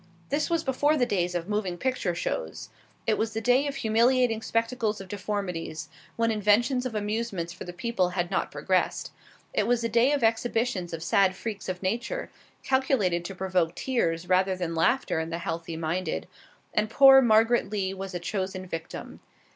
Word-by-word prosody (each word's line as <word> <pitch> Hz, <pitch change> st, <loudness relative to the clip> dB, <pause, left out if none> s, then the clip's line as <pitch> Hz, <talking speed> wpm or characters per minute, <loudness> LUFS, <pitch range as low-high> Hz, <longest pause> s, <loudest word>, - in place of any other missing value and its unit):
This 290 Hz, +4 st, 0 dB
was 335 Hz, -1 st, +1 dB
before 290 Hz, +3 st, +2 dB
the 250 Hz, -, +3 dB
days 180 Hz, -5 st, -1 dB
of 175 Hz, 0 st, -2 dB
moving 205 Hz, -4 st, -2 dB
picture 250 Hz, -7 st, -1 dB
shows; -, -, -4 dB, 0.4 s
it 220 Hz, -, +1 dB
was 220 Hz, 0 st, -1 dB
the 220 Hz, -, -1 dB
day 250 Hz, +5 st, +3 dB
of 280 Hz, -, -3 dB
humiliating 230 Hz, +1 st, +2 dB
spectacles 230 Hz, -1 st, -1 dB
of 195 Hz, -, -9 dB
deformities, 180 Hz, -6 st, -4 dB, 0.3 s
when 230 Hz, 0 st, +1 dB
inventions 225 Hz, +5 st, +2 dB
of 230 Hz, -, -8 dB
amusements 210 Hz, -5 st, -2 dB
for 180 Hz, -, -9 dB
the 175 Hz, -, -6 dB
people 185 Hz, 0 st, 0 dB
had 175 Hz, -1 st, -2 dB
not -, -, 0 dB
progressed. -, -, 0 dB, 0.4 s
It -, -, +1 dB
was 240 Hz, -1 st, +2 dB
the 230 Hz, -, -1 dB
day 235 Hz, +5 st, +4 dB
of 285 Hz, -4 st, 0 dB
exhibitions 225 Hz, -4 st, 0 dB
of 165 Hz, -1 st, -5 dB
sad 190 Hz, +2 st, +3 dB
freaks 205 Hz, -1 st, -5 dB
of 185 Hz, +1 st, -4 dB
nature, 230 Hz, +7 st, -2 dB, 0.3 s
calculated 260 Hz, -10 st, +1 dB
to 195 Hz, -, -6 dB
provoke 180 Hz, -3 st, 0 dB
tears 180 Hz, -10 st, -1 dB
rather 185 Hz, +1 st, +3 dB
than 175 Hz, -2 st, -3 dB
laughter 200 Hz, +3 st, +1 dB
in 160 Hz, 0 st, -3 dB
the 165 Hz, -, -3 dB
healthy 165 Hz, -1 st, -4 dB
minded, 170 Hz, +3 st, -2 dB, 0.5 s
and 215 Hz, 0 st, +1 dB
poor 270 Hz, +2 st, +8 dB
Margaret 225 Hz, -1 st, +4 dB
Lee 195 Hz, -2 st, -1 dB
was 195 Hz, -1 st, -6 dB
a -, -, -2 dB
chosen 185 Hz, +1 st, -3 dB
victim. 165 Hz, -2 st, -7 dB
210 Hz, 180 wpm, -27 LUFS, 180-240 Hz, 0.5 s, poor